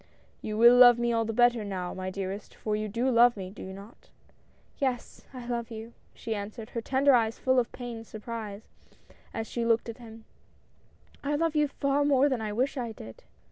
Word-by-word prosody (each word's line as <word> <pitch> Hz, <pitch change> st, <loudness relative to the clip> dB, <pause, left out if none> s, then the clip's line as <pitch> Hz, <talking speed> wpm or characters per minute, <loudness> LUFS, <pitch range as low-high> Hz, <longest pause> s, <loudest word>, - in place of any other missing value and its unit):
"You 215 Hz, -1 st, -4 dB
will 235 Hz, +2 st, +8 dB
love 245 Hz, -1 st, +8 dB
all 235 Hz, -1 st, +1 dB
the 225 Hz, -, -2 dB
better 240 Hz, 0 st, +3 dB
now, 185 Hz, -3 st, -4 dB
my 185 Hz, 0 st, -4 dB
dearest, 195 Hz, +2 st, -6 dB
for 215 Hz, -1 st, -2 dB
you 215 Hz, 0 st, -3 dB
do 235 Hz, +5 st, -1 dB
love 240 Hz, -1 st, +5 dB
me, 185 Hz, -1 st, -6 dB
do 205 Hz, -, -11 dB
you 190 Hz, -, -7 dB
not?" 200 Hz, +4 st, -13 dB, 0.7 s
"Yes, 260 Hz, -3 st, -3 dB
I 250 Hz, -3 st, -8 dB
love 235 Hz, -1 st, -3 dB
you," 225 Hz, 0 st, -8 dB, 0.2 s
she 225 Hz, -, -4 dB
answered, 215 Hz, +2 st, -7 dB
her 230 Hz, -, -3 dB
tender 270 Hz, +4 st, +3 dB
eyes 225 Hz, -2 st, +2 dB
full 260 Hz, 0 st, +2 dB
of 240 Hz, -, -1 dB
pained 235 Hz, -3 st, -7 dB
surprise, 215 Hz, -1 st, -7 dB, 0.7 s
as 225 Hz, -, -4 dB
she 235 Hz, +1 st, -3 dB
looked 230 Hz, 0 st, +1 dB
at 230 Hz, -, -8 dB
him; 225 Hz, -2 st, -12 dB, 0.5 s
" -, -, -31 dB
I 290 Hz, +1 st, 0 dB
love 325 Hz, +1 st, 0 dB
you 300 Hz, -1 st, +3 dB
far 280 Hz, 0 st, 0 dB
more 285 Hz, 0 st, +4 dB
than 255 Hz, -4 st, -1 dB
I 215 Hz, -1 st, -3 dB
wish 260 Hz, +6 st, -1 dB
I 240 Hz, -3 st, -3 dB
did 110 Hz, -, -11 dB
230 Hz, 205 wpm, -28 LUFS, 215-250 Hz, 0.7 s, will